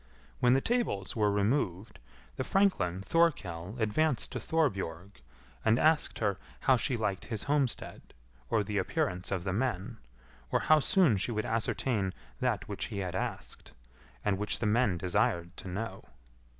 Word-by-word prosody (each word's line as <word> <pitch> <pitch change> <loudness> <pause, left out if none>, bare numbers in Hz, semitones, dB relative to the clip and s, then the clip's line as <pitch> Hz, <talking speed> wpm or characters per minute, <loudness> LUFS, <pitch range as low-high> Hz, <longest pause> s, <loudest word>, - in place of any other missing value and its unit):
When 125 0 +5
the 135 - +3
tables 225 - -1
were 105 -2 +3
removed, 100 -2 0 0.4
the - - -2
franklin 100 - +1
Thorkell 100 - +1
advanced 120 +5 +1
to - - -3
Thorbjorg 100 - -1 0.4
and 110 +1 +4
asked 155 +2 +2
her 100 -3 0 0.2
how 130 - +5
she 125 0 0
liked 100 -4 -2
his 110 -3 -3
homestead, 140 -3 -1 0.3
or 110 - +2
the 105 0 -1
appearance 90 -1 -1
of 95 -3 -2
the 95 -1 -2
men; 115 -1 -2 0.5
or - - +2
how 155 0 +5
soon 165 - +4
she 100 - -1
would 110 -1 -1
ascertain 110 -3 -1 0.2
that - - 0
which - - -3
he - - -6
had 90 -3 -3
asked, 95 - -5 0.5
and 100 -2 +1
which 105 - 0
the 115 - -2
men 110 -3 +2
desired 85 0 0
to - - -8
know. 100 +2 -5
105 Hz, 155 wpm, -31 LUFS, 95-130 Hz, 0.5 s, When